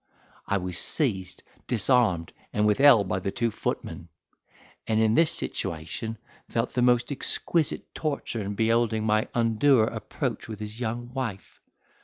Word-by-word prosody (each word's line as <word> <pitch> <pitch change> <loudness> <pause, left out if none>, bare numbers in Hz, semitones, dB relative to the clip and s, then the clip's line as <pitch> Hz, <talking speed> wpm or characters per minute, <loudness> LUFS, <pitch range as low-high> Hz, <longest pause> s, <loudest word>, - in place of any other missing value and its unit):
I 100 - +1
was 90 -2 -3
seized, 100 - 0 0.2
disarmed, 110 -7 +2 0.2
and 105 0 +1
withheld 110 -1 +6
by 95 - -1
two 100 +5 -1
footmen; 85 - -4 0.8
and 110 0 +2
in 110 -1 +3
this 165 +5 +4
situation 85 +8 -4 0.3
felt 115 +1 -1
the 125 - +1
most 120 +2 +3
exquisite 155 +3 -1
torture 140 -7 -3
in 100 0 -4
beholding 110 0 +1
my 110 0 +2
undoer 115 +1 +4
approach - - -4
with 110 -2 -6
his 105 +2 -7
young 120 +1 -4
wife. 115 -8 -5
110 Hz, 135 wpm, -26 LUFS, 100-120 Hz, 0.8 s, withheld